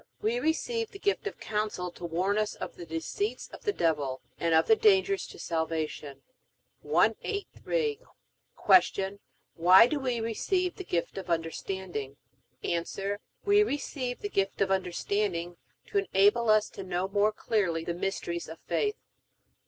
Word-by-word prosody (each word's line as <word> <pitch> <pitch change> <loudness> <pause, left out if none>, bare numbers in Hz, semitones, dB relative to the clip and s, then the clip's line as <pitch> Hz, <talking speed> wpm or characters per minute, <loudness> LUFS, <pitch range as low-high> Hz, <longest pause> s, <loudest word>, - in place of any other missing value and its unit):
We 230 +3 0
receive 435 - 0
the - - -10
gift 405 +1 0
of - - -6
Counsel 210 -4 -2
to 175 - -14
warn 185 +5 0
us 215 0 -1
of - - -6
the 175 - -9
deceits 165 - -3
of - - -11
the 415 - +3
devil, 150 - 0 0.2
and 165 -1 +2
of 160 - +5
the 445 - +6
dangers 395 -3 +3
to - - -12
salvation. 160 -4 -3 0.6
183. 440 +2 0 0.9
Q. 195 +1 -4 0.3
Why 180 +6 +8
do 290 +4 -1
we 250 -3 -1
receive 355 - -1
the 380 - -5
gift 175 - -2
of 185 -2 -9
Understanding? 165 -3 -3 0.5
A. 170 -1 0 0.6
We 410 0 +5
receive 275 -8 -2
the 410 - -3
gift 195 - 0
of 195 -1 +2
Understanding 180 -1 -1 0.3
to 405 - +2
enable 225 - +3
us 215 0 +5
to - - -8
know 185 0 -1
more 205 +2 +2
clearly 190 -7 0
the 170 - -1
mysteries 170 -1 -3
of 160 - -8
faith. 420 -1 0
200 Hz, 150 wpm, -29 LUFS, -, 0.9 s, Why